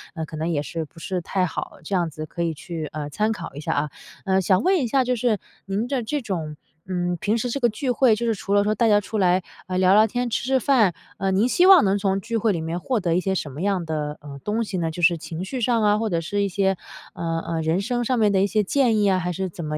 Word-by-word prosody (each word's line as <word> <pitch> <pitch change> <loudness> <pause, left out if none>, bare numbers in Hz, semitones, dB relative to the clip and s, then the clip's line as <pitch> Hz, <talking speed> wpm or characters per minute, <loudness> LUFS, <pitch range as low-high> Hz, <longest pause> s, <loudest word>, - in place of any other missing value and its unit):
呃， 160 -2 -3
可 155 - -9
能 160 +2 -2
也 155 -4 0 0.3
不 170 - -16
是 180 +3 -3
太 185 +2 0
好， 170 - -5
这 195 +5 -2
样 175 -2 +1
子 155 0 -7
可 170 +2 -4
以 165 -1 -1
去， 160 0 -6
呃， 150 -1 -5
参 215 +8 0
考 170 -9 -6
一 - - -6
下 - - -1
啊。 150 +1 -1 0.4
呃， 190 0 +2
想 185 +1 +3
问 380 +1 +4
一 255 - 0
下， 265 +3 +2
就 250 0 0
是 230 -3 +1 0.3
您 205 +4 -2
的 260 -3 -1
这 290 +6 -2
种， 165 -9 -4 0.3
嗯， 175 -1 -1
平 215 +6 +1
时 245 +2 -2
这 280 - -2
个 240 -2 +3
聚 250 +4 -2
会， 245 -2 +4
就 235 - -3
是 230 - +2
除 200 0 -3
了 205 0 +4
说 210 +1 +1
大 230 0 +2
家 205 -1 +5
出 210 +2 -5
来， 185 -2 +3 0.2
呃， 185 0 -2
聊 185 0 +5
聊 215 +2 +6
天、 245 +2 -2
吃 225 - -1
吃 265 0 +3
饭， 230 -8 +3 0.2
呃， 195 0 0
您 200 +5 +3
希 350 +8 +3
望 380 -4 +9
能 195 +1 +2
从 195 -1 0
聚 230 +4 -5
会 220 0 +2
里 170 -4 -2
面 165 +2 -3
获 245 +5 -1
得 170 -4 0
一 - - +3
些 190 +1 -1
什 150 -5 -3
么 145 +5 -7
样 195 -3 0
的， 150 -2 -3
呃， 140 -1 -9
东 220 +2 0
西 210 -3 -4
呢？ 165 -2 -1
就 175 - -6
是 170 0 +5
情 165 +2 -6
绪 255 +5 -4
上 230 -1 +2
啊， 210 0 +4
或 225 0 -1
者 170 -3 0
是 205 +5 -2
一 200 - 0
些， 195 +1 +1 0.4
呃 165 -2 -2
呃， 165 -1 -1
人 160 +3 +1
生 240 +3 -1
上 255 +1 0
面 215 -3 +3
的 190 -1 +3
一 200 - +3
些 210 +2 +1
建 240 +1 +2
议 205 -1 +3
啊， 185 -1 +2
还 180 0 -2
是 190 +2 -2
怎 170 0 -8
么 150 0 -3
195 Hz, 315 characters per minute, -23 LUFS, 170-225 Hz, 0.4 s, 望